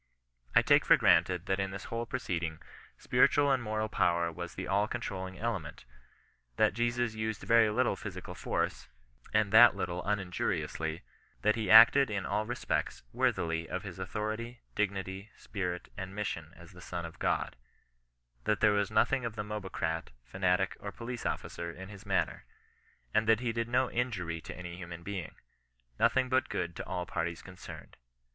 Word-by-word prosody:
I - - +7
take - - +5
for - - +6
granted 90 +1 +3
that 95 -1 0
in 95 0 0
this 95 0 -7
whole 115 0 -4
proceeding, 85 -11 -2 0.4
spiritual 145 -1 +3
and 130 -2 +2
moral 110 -1 -1
power 85 -5 +1
was 85 +1 -7
the 95 - -5
all 100 +2 +2
controlling 95 -6 -5
ele 115 -3 -1
ment; 70 -5 -11 0.7
that - - +3
Jesus 120 +1 0
used 110 -1 -3
very 115 -1 +5
little 120 +4 +1
physical - - -7
force, - - -2 0.4
and 105 -2 +2
that 120 -1 +9
little 90 -2 -3
uninjuriously; 90 -4 -2 0.4
that 105 0 +4
he 110 -4 -2
acted 120 +5 +9
in 100 -2 -2
all 110 +1 -1
respects 120 0 -2
worthily 80 0 0
of 95 - -3
his 95 -2 -8
authority, 110 +5 -4
dignity, 95 0 -2
spirit, 90 -3 -4
and 95 +1 -6
mission 80 -7 -3
as 85 +2 -14
the 90 -1 -14
Son 85 -2 -5
of 85 - -10
God; - - 0 0.9
that 105 - +1
there 105 -1 +5
was 100 -1 +1
nothing 125 +4 +2
of 115 -2 -4
the 105 - -3
mobocrat, 95 -6 -3
fanatic, 90 +8 0
or 100 - -6
police 120 +2 -5
officer 85 0 -4
in 95 +3 -10
his 100 0 -12
manner; 95 -1 0 0.7
and 110 - +2
that 110 -1 +5
he 120 -2 -1
did 115 0 -2
no 125 +2 +2
injury 95 -10 -2
to - - -9
any 90 -1 -7
human 85 -1 -8
being, 95 -3 -5 0.3
— - - -39
^nothing 130 +3 +3
but 130 0 +1
good 85 -1 -3
to - - -6
all 90 -1 -3
parties 85 0 -3
concerned. 90 0 -11
100 Hz, 170 wpm, -31 LUFS, 90-110 Hz, 0.9 s, that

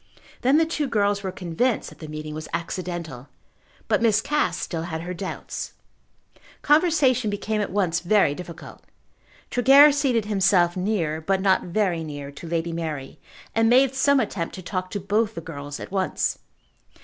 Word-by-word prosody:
Then 265 +4 +4
the 325 - +4
two 310 -3 -2
girls 205 -4 +1
were 190 -1 -3
convinced 185 +7 -1
that - - -16
the 155 - -8
meeting 155 0 -6
was 155 0 -6
accidental; 170 -7 -5 0.6
but - - +2
Miss 220 -3 +4
Cass 295 +6 0
still 165 -2 -4
had 160 -1 -4
her 180 +2 -5
doubts. 185 +2 -6 0.9
Conversation 295 -7 +3
became 210 +1 -2
at 205 - -2
once 180 -4 0
very 185 -4 +3
difficult. 170 +1 -10 0.7
Tregear 275 +4 +7
seated 265 -6 +1
himself 190 -4 +3
near, 180 -5 -1
but 190 +4 0
not 190 0 +2
very 180 -2 0
near, 145 -2 -7
to 145 +4 -10
Lady 170 0 -1
Mary, 155 -4 -5 0.3
and 225 0 +3
made 260 +2 +5
some 280 +1 +3
attempt 200 -7 -3
to 185 - -9
talk 185 0 -3
to 205 - -4
both 210 +3 0
the - - -4
girls 145 -3 -7
at - - -8
once. 190 -1 -1
190 Hz, 165 wpm, -24 LUFS, 165-225 Hz, 0.9 s, Tregear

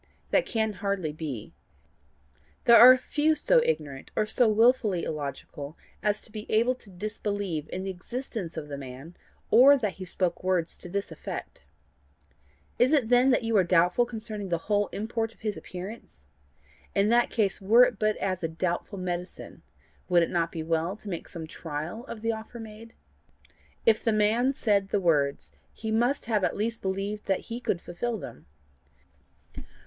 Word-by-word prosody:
That - - +3
can 220 -2 0
hardly 200 -6 -1
be. 145 -8 -6 1.1
There 235 - +8
are 255 +1 +10
few 300 +4 +1
so - - +4
ignorant, 145 - -3
or - - +2
so 235 +3 +3
wilfully 215 -4 +3
illogical 145 0 -6 0.2
as 210 0 +1
to 220 - -14
be 215 0 -8
able 235 +4 +3
to 250 -5 -16
disbelieve 200 -4 -4
in 185 - -4
the 195 - -3
existence 190 -2 -6
of 150 -2 -5
the 140 -1 -6
man, 135 +5 -9 0.4
or 275 +4 +8
that 210 -7 -3
he - - -4
spoke 180 0 -1
words 185 -3 0
to 180 - -8
this 200 0 -3
effect. 160 - -7 1.2
Is 255 +5 +4
it 265 -7 +3
then 245 +2 +5
that 250 - +3
you 225 0 0
are 190 - +5
doubtful 180 +6 +3
concerning 215 -4 -6
the 170 - +1
whole 205 +4 0
import 225 +1 -3
of - - -30
his 215 -2 -2
appearance? 185 - -9 0.7
In 200 +1 +3
that 240 +1 +4
case, 205 -4 0
were 225 +6 +6
it 245 -5 +1
but 215 0 +1
as 185 -2 -2
a 165 - 0
doubtful 175 +4 -3
medicine, 180 -1 -5 0.5
would 175 -1 +5
it - - -2
not 170 -1 0
be 160 - -4
well 165 +3 -1
to 215 - -9
make 170 -3 -5
some 165 -2 -7
trial 160 +8 -6
of 220 -1 -8
the 230 - +1
offer 225 +2 -7
made? 225 +1 -10 0.9
If 220 -1 +4
the 225 - +2
man 220 +5 +2
said 200 -6 +1
the 205 - +1
words, 145 -6 +1 0.2
he 220 -1 -5
must 240 +6 +1
have 215 -4 0
at - - 0
least 225 +2 -2
believed 195 +2 -3
that 195 - +1
he 235 - -3
could 195 -7 -1
fulfil 225 +7 -3
them. 120 - -10
205 Hz, 175 wpm, -27 LUFS, 175-230 Hz, 1.2 s, are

